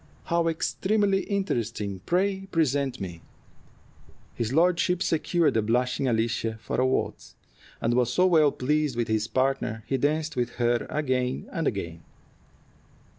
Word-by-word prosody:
"How 170 0 +1
extremely 195 +4 +1
interesting! 115 - -2
Pray 195 +2 0
present 145 -6 0
me." 85 -3 -6 1.1
His 115 -1 -2
lordship 180 +3 +2
secured 165 +1 +1
the 110 - +2
blushing 125 +4 0
Alicia 115 -1 0
for 115 - -2
a 130 - +3
waltz, 130 - -2 0.4
and 115 - 0
was 125 -1 +2
so 180 - +3
well 160 -5 +5
pleased 150 +1 0
with 120 -1 -1
his 110 0 0
partner 130 -4 -1
he 135 - 0
danced 155 +3 0
with 120 -1 -1
her 120 -1 +1
again 130 -4 -1
and 165 -2 -1
again. 85 -5 -3
130 Hz, 135 wpm, -26 LUFS, 115-165 Hz, 1.1 s, well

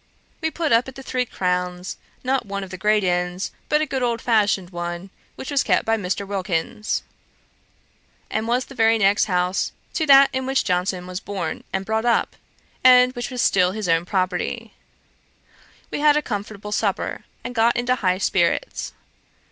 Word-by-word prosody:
We 320 - +1
put 320 -1 -2
up 230 +2 +4
at 265 - -9
the 270 - -9
Three 255 -1 -1
Crowns, 180 -1 -2 0.3
not 260 -2 0
one 200 0 -3
of 190 - -9
the 185 - -6
great 210 0 +3
inns, 180 0 -1 0.2
but 300 0 +3
a - - +1
good 265 -2 -3
old 235 -2 0
fashioned 205 -6 +1
one, 175 +2 -5 0.2
which 265 - -7
was 280 -1 +3
kept - - +1
by 225 - +2
Mr. 200 -1 -3
Wilkins, 200 +2 -2 1.2
and 220 +1 -2
was 245 +2 +1
the - - -12
very 225 -2 +3
next 200 -1 +3
house 180 -1 0 0.2
to 315 - -1
that 275 0 +8
in 260 0 -2
which 270 0 +1
Johnson 180 0 -1
was 180 0 -5
born 190 -6 -4
and 190 0 -2
brought 220 +2 -1
up, 235 - +1 0.5
and 250 0 +7
which 245 -1 -4
was 250 -2 -1
still 180 -1 +3
his 215 -2 -3
own 165 0 +2
property. 190 +5 -2 1.2
We - - -2
had 300 0 +5
a 300 - 0
comfortable 210 -1 -5
supper, - - -1 0.2
and 245 - -5
got 230 0 +3
into 245 +1 +1
high 185 -7 +1
spirits. 185 -3 0
210 Hz, 180 wpm, -22 LUFS, 185-250 Hz, 1.2 s, that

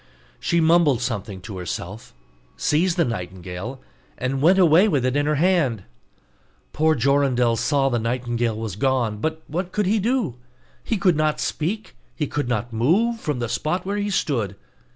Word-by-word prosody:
She 170 - +1
mumbled 160 -5 +4
something 105 -6 -4
to 95 0 -7
herself, 90 - -6 0.4
seized 170 +4 +1
the 170 - +3
nightingale, 95 +3 -5 0.4
and 130 +1 -2
went 175 +6 +5
away 180 +2 +6
with 140 - +1
it 130 +1 0
in 145 0 +1
her 150 - +2
hand. 150 - +2 0.9
Poor 155 +1 +3
Jorindel 130 -2 +2
saw 135 +4 +1
the 120 -3 0
nightingale 120 -1 -1
was 110 -4 -4
gone 120 -2 0
but 160 +4 -3
what 175 +4 -4
could 210 0 0
he 210 +4 +2
do? 220 - 0 0.5
He 225 - -1
could 185 -3 +3
not 155 0 +1
speak, 205 +8 -3 0.2
he 150 - -1
could 145 -2 -3
not 120 0 -2
move 195 - +2
from 150 - -2
the 120 -1 -2
spot 155 +11 -2
where 200 +2 -2
he 205 0 -1
stood. 120 - -1
140 Hz, 170 wpm, -23 LUFS, 115-170 Hz, 0.9 s, away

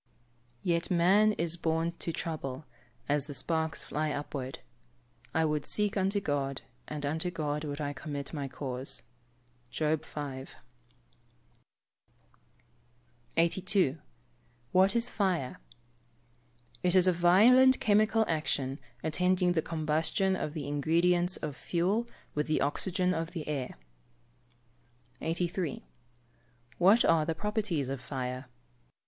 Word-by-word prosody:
[Verse: 120 +1 -37
"Yet 170 -1 +1
man 195 +5 +4
is 170 -2 -1
born 165 0 0
to 165 - -1
trouble, 155 -4 -4 0.4
as 145 0 +1
the 145 - -4
sparks 160 0 -1
fly 155 +1 -2
upward. 140 -3 -4 0.7
I 160 0 +2
would 150 -2 -1
seek 210 -1 +1
unto 195 +1 +1
God, 140 -6 -2 0.2
and 150 -1 -4
unto 160 +5 -1
God 150 -3 -2
would 145 0 -4
I 145 -1 -2
commit 145 +1 -6
my 145 -3 -3
cause." 130 -1 -4 0.7
JOB 155 +2 0
V.] 140 -4 -6 2.9
82. 170 -2 +2 0.7
What 190 +3 +4
is 235 0 +2
fire? 180 -10 -1 1.2
It 180 0 +2
is 185 -1 +7
a 185 - +4
violent 225 +10 +6
chemical 215 +1 +3
action 140 -4 -1 0.2
attending 180 +3 +2
the 160 - +2
combustion 160 +5 0
of 150 -3 -4
the 145 -3 -4
ingredients 170 +5 +2
of 150 -3 -5
fuel 190 +10 0 0.3
with 150 0 -1
the 155 - +1
oxygen 180 +5 +1
of 165 0 -3
the 160 -4 -5
air. 135 - -3 1.4
83. 170 -1 -2 1.0
_What 200 +7 +6
are 165 -2 +4
the 160 +1 -2
properties 210 - -1
of 135 -1 -4
fire? 130 -1 -4
160 Hz, 120 wpm, -30 LUFS, 145-185 Hz, 2.9 s, is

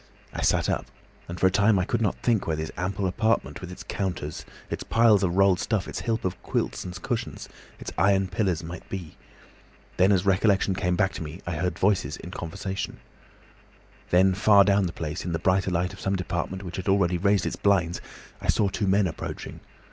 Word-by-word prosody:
I - - -4
sat - - +2
up, - - -1 0.4
and 85 0 -6
for - - +3
a 95 - +5
time 100 +2 +4
I 90 - +1
could 115 +3 -1
not 105 - +1
think 115 -5 +2
where 80 - +1
this 80 0 -4
ample 95 +2 -2
apartment, 110 +5 0
with 90 -1 -7
its 90 - -9
counters, 95 -2 -4 0.2
its - - -3
piles 115 -4 +4
of 90 -3 0
rolled 95 -2 +4
stuff, 105 -5 -1
its - - -5
heap 115 -3 -1
of 90 0 -3
quilts - - -2
and 90 0 -7
cushions, - - -3 0.3
its - - -6
iron 95 -1 +3
pillars, 95 -3 -1
might 85 +2 -8
be. 90 -5 -6 0.8
Then, 95 +2 +5
as 95 -1 +2
recollection 100 0 +3
came 90 -1 0
back 95 -1 +1
to 85 - -6
me, 80 +5 -8
I 85 - -3
heard 90 +4 -1
voices 95 -6 +1
in 90 - -9
conversation. 95 +2 -5 1.1
"Then 95 +2 +5
far 100 +1 +6
down 100 -1 +3
the - - -4
place, 80 +1 -5
in 90 - -3
the - - +1
brighter 95 +1 +1
light 90 0 -1
of - - -12
some 95 0 0
department 90 +1 -3
which 90 -1 -6
had 95 +1 -3
already 90 -3 +2
raised 100 0 +2
its - - -2
blinds, 90 -4 +1 0.4
I - - -5
saw 100 - +3
two 100 +1 -2
men 100 +1 +3
approaching. 80 - -5
95 Hz, 210 wpm, -26 LUFS, 90-100 Hz, 1.1 s, far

